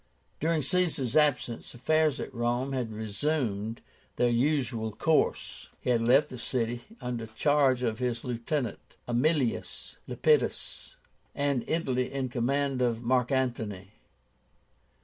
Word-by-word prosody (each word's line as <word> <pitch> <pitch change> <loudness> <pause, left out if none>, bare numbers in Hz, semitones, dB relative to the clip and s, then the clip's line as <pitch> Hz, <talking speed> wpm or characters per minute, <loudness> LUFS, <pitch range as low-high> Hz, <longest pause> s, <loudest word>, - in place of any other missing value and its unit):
During 160 -1 +1
Caesar's 160 -10 +1
absence, 145 -7 +1
affairs 155 +3 +2
at - - -5
Rome 120 +2 -1
had 125 -4 -2
resumed 110 0 -2 0.3
their 120 -1 +2
usual 120 -3 +1
course. 155 +9 0
He 125 - -1
had 115 -2 +2
left 135 +6 +4
the 125 - -8
city 120 -1 -2 0.2
under 120 -2 -4
charge 135 +2 +2
of 110 -2 -1
his 120 -2 -2
lieutenant, 120 0 -3
Aemilius 125 +1 0
Lepidus, 465 +2 0 0.4
and 140 -3 0
Italy 130 -6 0
in 135 -2 -2
command 135 +2 0
of 120 -1 0
Mark 125 +1 +2
Antony. 110 -7 -2
125 Hz, 120 wpm, -29 LUFS, 115-140 Hz, 0.4 s, left